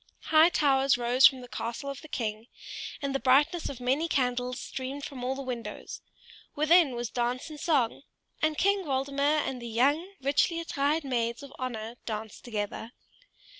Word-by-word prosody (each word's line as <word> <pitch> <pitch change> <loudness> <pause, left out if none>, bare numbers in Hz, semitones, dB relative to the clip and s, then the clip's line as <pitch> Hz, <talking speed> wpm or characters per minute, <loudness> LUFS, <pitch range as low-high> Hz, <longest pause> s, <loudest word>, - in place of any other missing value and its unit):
High 315 +2 +8
towers 275 -6 +3
rose 245 +2 +6
from 260 -1 -3
the 245 - -10
castle 240 +3 -5
of 275 0 -5
the - - -11
king, 220 -4 -4 0.6
and 275 -1 -1
the 275 - 0
brightness 295 +7 +3
of 270 - -7
many 265 +6 +1
candles 250 -3 0
streamed 270 +2 -5
from 260 -4 -7
all 260 +1 -1
the 275 - -5
windows; 245 -3 -6 0.5
within 310 -2 +4
was 240 -1 -4
dance 245 +4 -2
and 300 - -9
song, 275 -10 +1 0.4
and 310 -1 +1
King 400 0 +2
Waldemar 280 +1 +1
and 255 -2 -4
the 235 - -6
young, 290 - +1
richly 290 +5 +1
attired 305 -1 0
maids 235 -1 -1
of 280 0 -11
honor 235 -2 -4
danced 220 -1 -5
together. 220 +1 -4
265 Hz, 170 wpm, -29 LUFS, 245-295 Hz, 0.6 s, High